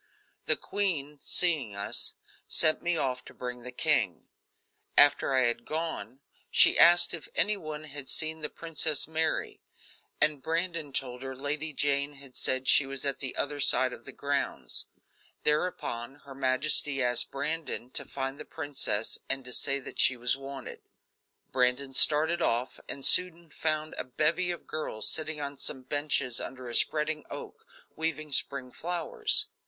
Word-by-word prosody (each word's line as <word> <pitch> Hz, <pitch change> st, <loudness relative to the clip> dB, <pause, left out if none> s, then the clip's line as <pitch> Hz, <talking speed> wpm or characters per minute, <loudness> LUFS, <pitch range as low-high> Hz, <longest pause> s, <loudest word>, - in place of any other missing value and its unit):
The -, -, +4 dB
queen, 150 Hz, -8 st, -2 dB
seeing 150 Hz, -, +3 dB
us, 100 Hz, +1 st, +3 dB, 0.3 s
sent 155 Hz, -, +4 dB
me 175 Hz, -1 st, -1 dB
off 130 Hz, -3 st, -2 dB
to -, -, -12 dB
bring 125 Hz, -1 st, -6 dB
the 125 Hz, +1 st, -7 dB
king. 125 Hz, -, 0 dB, 0.7 s
After 145 Hz, -1 st, +5 dB
I 130 Hz, -, +4 dB
had 120 Hz, -1 st, 0 dB
gone, 155 Hz, -5 st, -3 dB, 0.3 s
she -, -, +6 dB
asked 175 Hz, 0 st, +6 dB
if 165 Hz, -3 st, -6 dB
any 210 Hz, +1 st, +3 dB
one 155 Hz, -5 st, -7 dB
had 145 Hz, -3 st, -7 dB
seen 160 Hz, 0 st, +1 dB
the 150 Hz, -, -2 dB
Princess 160 Hz, -3 st, 0 dB
Mary, 160 Hz, 0 st, -1 dB, 0.6 s
and 150 Hz, -2 st, +2 dB
Brandon 165 Hz, 0 st, -1 dB
told 125 Hz, -2 st, -2 dB
her 130 Hz, 0 st, -6 dB
Lady 150 Hz, +3 st, -3 dB
Jane 140 Hz, 0 st, 0 dB
had 135 Hz, -2 st, -13 dB
said 130 Hz, 0 st, 0 dB
she 135 Hz, -, +5 dB
was 135 Hz, 0 st, -4 dB
at 140 Hz, -, 0 dB
the 135 Hz, -2 st, -4 dB
other 145 Hz, 0 st, -2 dB
side 130 Hz, -2 st, +3 dB
of 120 Hz, -, -12 dB
the -, -, -7 dB
grounds. 140 Hz, 0 st, -3 dB, 0.6 s
Thereupon 135 Hz, -6 st, -1 dB
her 140 Hz, -, -10 dB
majesty 135 Hz, +1 st, +1 dB
asked 120 Hz, 0 st, +1 dB
Brandon 140 Hz, -3 st, -4 dB
to -, -, -1 dB
find 135 Hz, 0 st, -6 dB
the -, -, -6 dB
princess 140 Hz, -8 st, -2 dB
and 135 Hz, -1 st, -2 dB
to 125 Hz, -, -6 dB
say 140 Hz, +2 st, 0 dB
that -, -, -10 dB
she 130 Hz, -, +5 dB
was 120 Hz, +1 st, +1 dB
wanted. 135 Hz, -1 st, -9 dB, 0.7 s
Brandon 130 Hz, +2 st, +1 dB
started 160 Hz, +5 st, +4 dB
off 120 Hz, -2 st, -1 dB
and 140 Hz, -, -1 dB
soon 170 Hz, -3 st, +5 dB
found 155 Hz, 0 st, -2 dB
a -, -, -2 dB
bevy 155 Hz, +7 st, 0 dB
of 175 Hz, -, -4 dB
girls 130 Hz, -8 st, -4 dB
sitting 155 Hz, -1 st, 0 dB
on 140 Hz, -1 st, -6 dB
some 130 Hz, -3 st, -3 dB
benches 140 Hz, -3 st, -1 dB
under 130 Hz, -1 st, -7 dB
a 120 Hz, -, -6 dB
spreading 155 Hz, +3 st, +2 dB
oak, -, -, -10 dB, 0.3 s
weaving 155 Hz, -2 st, -3 dB
spring 135 Hz, -1 st, 0 dB
flowers. 425 Hz, -, +2 dB
145 Hz, 160 wpm, -28 LUFS, 130-155 Hz, 0.7 s, she